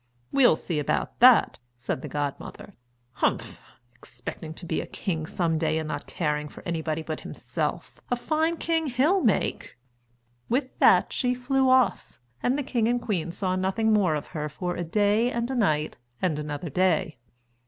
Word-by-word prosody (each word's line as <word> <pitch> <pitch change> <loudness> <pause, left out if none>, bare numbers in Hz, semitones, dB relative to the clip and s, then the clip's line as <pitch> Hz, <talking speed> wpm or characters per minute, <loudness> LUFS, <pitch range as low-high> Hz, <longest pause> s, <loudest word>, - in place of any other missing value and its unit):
"We'll 260 - +5
see 155 -1 -3
about 145 - -2
that," 245 -1 +6 0.2
said 120 +2 -3
the - - -6
godmother. 145 +6 -5 0.4
"Humph, - - -1 0.3
expecting 125 +6 -8
to 175 - -8
be - - -1
a - - -8
king 160 -6 -3
some 165 -3 0
day 155 -1 +1
and 160 -1 -3
not 145 -1 -5
caring 150 -4 -2
for - - -13
anybody 160 -1 -2
but 155 -1 -4
himself - - -4
a 245 - +2
fine 315 +6 0
king 325 -1 0
he'll 290 +10 +2
make!" 220 - 0 0.7
With 255 +2 -1
that - - +5
she 250 -1 0
flew 260 +1 +1
off, 255 -1 +2 0.2
and 255 +3 +1
the 290 - -1
king 240 -4 0
and 245 +1 +1
queen 180 -8 -2
saw 185 +1 -1
nothing 195 +4 +1
more 190 -7 +3
of 150 - -4
her 150 -2 -3
for 175 +4 -4
a 175 - -3
day 210 +7 +2
and 235 +1 -2
a - - -2
night 155 -10 +1 0.2
and 160 -5 0
another 150 +1 -5
day. 165 -5 +1
185 Hz, 175 wpm, -26 LUFS, 155-245 Hz, 0.7 s, that